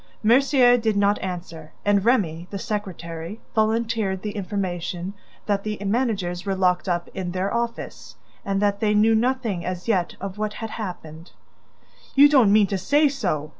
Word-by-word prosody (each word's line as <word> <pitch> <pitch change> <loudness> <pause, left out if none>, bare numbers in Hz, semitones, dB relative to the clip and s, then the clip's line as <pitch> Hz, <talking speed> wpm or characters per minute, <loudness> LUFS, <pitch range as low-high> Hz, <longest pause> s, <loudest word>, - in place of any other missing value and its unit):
Mercier 245 +1 +5
did 220 -3 0
not 200 +1 +2
answer, 170 -4 -6
and 205 -1 +3
Remy, 180 -8 +1
the 200 - -5
secretary, 185 -2 -5
volunteered 220 -3 0
the 210 - -3
information 185 -2 -4 0.3
that 200 -1 0
the 215 -1 -3
managers 195 -6 -1
were 195 -1 -1
locked 185 0 +1
up 175 -1 -1
in 180 -2 -4
their 185 +2 -1
office 235 0 -4 0.3
and 195 -2 -1
that 200 -1 +1
they 210 -1 +1
knew 220 +2 +4
nothing 230 -5 0
as 180 +1 -5
yet 185 -6 0
of 195 +1 -6
what 215 0 -2
had 225 0 -6
happened. 170 -6 -7 0.8
"You 280 +1 +8
don't 255 -8 +5
mean 210 0 +6
to 195 0 -2
say 290 +10 +3
so! 180 - -2
200 Hz, 165 wpm, -23 LUFS, 180-225 Hz, 0.8 s, You